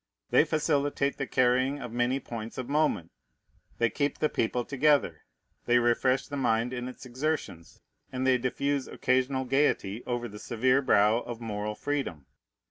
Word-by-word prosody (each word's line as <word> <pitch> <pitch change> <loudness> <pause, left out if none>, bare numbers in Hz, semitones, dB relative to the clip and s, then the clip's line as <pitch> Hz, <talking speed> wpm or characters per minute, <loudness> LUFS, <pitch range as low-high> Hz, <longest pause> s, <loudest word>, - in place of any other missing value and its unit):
They - - +5
facilitate 145 -3 0
the 135 - -3
carrying 130 +3 +2
of 125 -4 -7
many 120 +3 0
points 115 -3 -7
of 130 -2 -4
moment; 145 - 0 0.7
they 115 -1 +2
keep 145 0 -1
the 155 - +1
people 120 +1 -1
together; 140 - +2 0.5
they 120 0 +5
refresh 125 +2 +2
the 145 - -6
mind 120 -1 +1
in 125 0 -4
its 130 +1 -9
exertions; 130 - -4 0.3
and 130 0 -2
they 130 -1 +4
diffuse 140 +2 -1
occasional 130 +1 0
gayety 125 -5 +1
over 120 -1 -2
the 105 -2 -10
severe 125 +5 +2
brow 110 -2 +4
of 120 -1 -7
moral 105 -2 -4
freedom. 135 - -3
125 Hz, 155 wpm, -28 LUFS, 115-140 Hz, 0.7 s, They